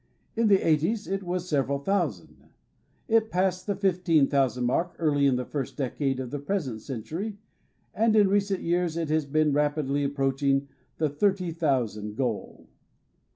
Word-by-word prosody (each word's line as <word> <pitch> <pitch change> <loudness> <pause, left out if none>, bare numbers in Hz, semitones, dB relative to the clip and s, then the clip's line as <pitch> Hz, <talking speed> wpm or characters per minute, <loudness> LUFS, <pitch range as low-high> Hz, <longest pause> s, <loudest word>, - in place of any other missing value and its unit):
In 230 -1 +2
the 200 -2 +4
'eighties 165 +8 +1
it 195 0 -2
was 180 -1 -3
several 140 -3 0
thousand. 140 - -2 0.6
It 225 0 +3
passed 185 0 0
the 200 - 0
fifteen 180 -6 +2
thousand 130 -3 +1
mark 165 +8 0
early 145 -3 +2
in 135 - +3
the 125 0 -2
first 140 -1 -5
decade 135 -1 -1
of 125 -2 -5
the 145 - -3
present 140 - -3
century, 160 - -5 0.6
and 220 +2 +2
in 210 -2 +6
recent 200 -1 +1
years 170 -1 0
it 165 -2 -2
has 155 -2 +1
been 155 0 +2
rapidly 145 -1 0
ap 140 0 -1
proaching 135 0 +1 0.3
the 155 - +1
thirty 185 +4 0
thousand 120 -10 -1
goal. 120 -4 -3
155 Hz, 160 wpm, -27 LUFS, 135-185 Hz, 0.6 s, in